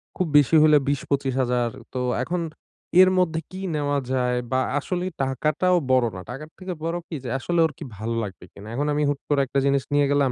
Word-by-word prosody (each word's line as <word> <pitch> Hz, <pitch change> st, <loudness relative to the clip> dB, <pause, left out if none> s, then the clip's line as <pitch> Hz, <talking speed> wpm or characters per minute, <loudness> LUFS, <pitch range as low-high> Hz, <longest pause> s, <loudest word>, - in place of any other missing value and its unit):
খুব 185 Hz, -, 0 dB
বেশি 145 Hz, +3 st, +4 dB
হলে 150 Hz, -1 st, +6 dB
২০ 140 Hz, -1 st, +1 dB
২৫,০০০। 130 Hz, -3 st, +1 dB, 0.2 s
তো 130 Hz, -, -2 dB, 0.2 s
এখন, 175 Hz, +5 st, -2 dB, 0.6 s
এর 185 Hz, -, +7 dB
মধ্যে 165 Hz, -3 st, +2 dB
কি 185 Hz, +1 st, -7 dB
নেওয়া 145 Hz, -1 st, 0 dB
যায় 125 Hz, -1 st, +1 dB
বা 130 Hz, -, +2 dB, 0.2 s
আসলেই 180 Hz, +4 st, -3 dB
টাকাটাও 155 Hz, +7 st, +1 dB, 0.2 s
বড় 130 Hz, -2 st, +4 dB
না। 90 Hz, -, -6 dB
টাকার 150 Hz, +5 st, -8 dB
থেকে 185 Hz, 0 st, -5 dB
বড় 165 Hz, +1 st, -1 dB
কি 165 Hz, -, -6 dB
যে 125 Hz, -, -5 dB
আসলে 170 Hz, +5 st, -1 dB
ওর 160 Hz, -, -1 dB
কি -, -, -7 dB
ভালো 115 Hz, +2 st, -3 dB
লাগবে 95 Hz, -4 st, -8 dB
কিনা। 100 Hz, +1 st, -11 dB
এখন 145 Hz, +3 st, 0 dB
আমি 150 Hz, 0 st, +1 dB
হুট 145 Hz, -, -1 dB
করে 145 Hz, -2 st, +3 dB
একটা 135 Hz, +1 st, 0 dB
জিনিস 140 Hz, -1 st, +2 dB
নিয়ে 145 Hz, 0 st, +4 dB
গেলাম, 140 Hz, -2 st, +3 dB
145 Hz, 210 wpm, -24 LUFS, 130-160 Hz, 0.6 s, এর